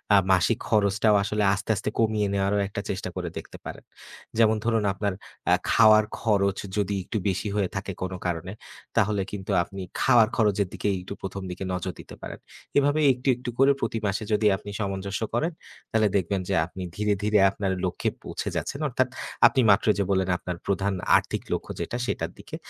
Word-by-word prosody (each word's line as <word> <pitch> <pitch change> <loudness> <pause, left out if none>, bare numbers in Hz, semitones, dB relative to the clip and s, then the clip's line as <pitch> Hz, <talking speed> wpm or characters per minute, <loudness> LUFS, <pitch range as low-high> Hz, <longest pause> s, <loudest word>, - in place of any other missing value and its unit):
আ - - +8
মাসিক 95 +5 +3
খরচটাও 105 0 +3
আসলে 105 +1 0
আস্তে, 100 +3 -5
আস্তে 95 - -2
কমিয়ে 110 -2 +2
নেওয়ারও 100 +1 +1
একটা 100 0 -4
চেষ্টা 95 -1 -3
করে 90 -2 -3
দেখতে - - -8
পারেন। - - -7 0.5
যেমন 110 -1 +5
ধরুন 115 -2 +2
আপনার 100 0 -1 0.3
অ্যা - - +6 0.2
খাওয়ার 110 -1 +6
খরচ 100 -3 +2 0.2
যদি 100 -1 0
একটু 110 - -3
বেশি 95 +3 -2
হয়ে 100 -3 +1
থাকে 95 0 -3
কোনো 95 0 -3
কারণে, 90 +1 -2 0.5
তাহলে 105 -2 +2
কিন্তু 100 0 -5
আপনি 95 +2 -8 0.2
খাওয়ার 120 -4 +6
খরচের 105 -3 +2
দিকেই 100 -1 0
একটু 90 - -7
১ম 95 +1 -5
দিকে 90 +2 -6
নজর 90 0 -3
দিতে - - -10
পারেন। - - -7 0.4
এভাবে 145 +2 +3
একটু, 125 +2 -8
একটু 125 +1 -6
করে 135 +1 +6
প্রতি 115 0 -1
মাসে 100 +2 -1
যদি 105 +1 +2
আপনি 105 - -10
সামঞ্জস্য 100 -1 -3
করেন, 155 +9 +1 0.4
তাহলে 110 -1 +3
দেখবেন 95 +1 -1
যে - - +1
আপনি 90 +2 -8
ধীরে, 105 0 +1
ধীরে 105 0 +3
আপনার 100 -1 -2
লক্ষ্যে 90 - -1
পৌঁছে - - -4
যাচ্ছেন। 140 - -4
অর্থাৎ 130 +1 +1 0.4
আপনি 135 - +2
মাত্রই 105 +2 +4
যে - - +3
বললেন 95 -1 +1
আপনার 90 -1 -5
প্রধান 100 0 0 0.2
আর্থিক - - -3
লক্ষ্য - - -3
যেটা 120 - -3
সেটার - - -2
দিকে। - - -8
100 Hz, 185 wpm, -26 LUFS, 95-110 Hz, 0.5 s, আ